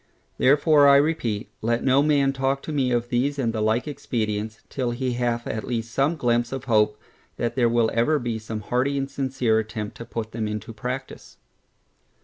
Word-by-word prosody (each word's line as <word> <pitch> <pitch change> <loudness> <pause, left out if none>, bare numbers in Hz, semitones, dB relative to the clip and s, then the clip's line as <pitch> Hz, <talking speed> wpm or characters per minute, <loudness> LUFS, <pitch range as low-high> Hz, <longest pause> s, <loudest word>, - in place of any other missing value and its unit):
Therefore 145 +1 +5
I 140 - +8
repeat, 140 -8 0
let 115 +1 0
no 135 +1 +4
man 145 -2 +3
talk 135 +1 -1
to - - -5
me 135 -4 +1
of 120 0 0
these 135 +4 0
and 115 -4 0
the 110 - -2
like 110 +5 +1
expedients, 110 -6 -3
till 130 -3 -2
he 125 +1 -2
hath 120 -1 -1
at 110 - -3
least 115 -1 -3
some 140 +5 +2
glympse 120 -2 +1
of 135 -2 -4
hope, 105 -4 +2 0.4
that 120 - -2
there 120 -3 +3
will 115 -1 +2
ever 120 +7 +2
be 120 -4 -3
some 110 0 -6
hearty 130 +6 0
and 135 0 -1
sincere 130 -5 +1
attempt 105 -1 -5
to 115 - -8
put 110 -1 -5
them 110 -1 -3
into 105 +2 -5
practice. 125 +4 -6
120 Hz, 190 wpm, -24 LUFS, 110-135 Hz, 0.4 s, I